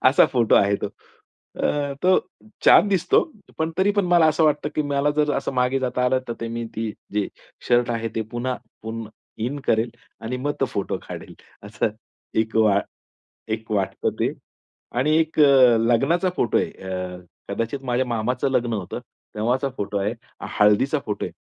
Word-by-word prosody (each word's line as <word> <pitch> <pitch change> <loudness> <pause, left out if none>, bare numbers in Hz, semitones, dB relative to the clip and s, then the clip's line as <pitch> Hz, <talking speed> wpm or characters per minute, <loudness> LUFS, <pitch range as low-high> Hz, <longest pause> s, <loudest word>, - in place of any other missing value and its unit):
असा 135 - +5
फोटो 120 -3 +3
आहे 100 0 +4
तो. - - -3 0.7
अ, 145 -1 0
तो 185 +1 +5 0.5
छान 205 - +8
दिसतो. 185 -3 +3 0.4
पण 160 +1 0
तरी 195 +2 +4
पण 200 - +3
मला 175 -2 +5
असं 155 +1 +3
वाटतं, 150 -1 +2
की 155 - +1
मला 145 0 +1
जर 150 -1 +2
असं 135 - -2
मागे 125 +1 +2
जाता 125 -1 -1
आलं 130 +1 +3
तर 115 0 -4
मी 115 0 -4
ती 110 -1 -2 0.2
जे 105 -1 0 0.4
शर्ट 120 0 +3
आहे 115 -1 -1
ते 110 - 0
पुन्हा 125 +1 -2 0.3
पुन्हा 110 0 -6 0.3
इन 140 +4 -2
करेल 115 +1 +2 0.3
आणि 125 +3 -3
मग 145 +3 -1
तो - - +4
फोटो 100 - -2
काढेल - - -8 0.3
असं 110 +1 -1 0.5
एक 110 0 -3
वा 105 -2 +4 0.8
एक 110 0 -18
वाटतं 95 -3 0
ते - - +1 0.7
आणि 155 +4 +3
एक 160 -1 0
अ, 130 -5 +7
लग्नाचा 135 +11 +2
फोटो 120 - +2
आहे. - - -1
अ, 90 -1 -5 0.3
कदाचित 115 +4 -3
माझ्या 125 +1 0
मामाचं 125 +3 -1
लग्न 120 -2 +1
होतं 100 -5 -4 0.4
तेव्हाचा 125 +6 0
फोटो 100 0 -2
आहे. 105 +4 -1 0.4
हळदीचा 105 +8 +4
फोटो 105 - -2
आहे. - - -9
125 Hz, 170 wpm, -23 LUFS, 110-145 Hz, 0.8 s, छान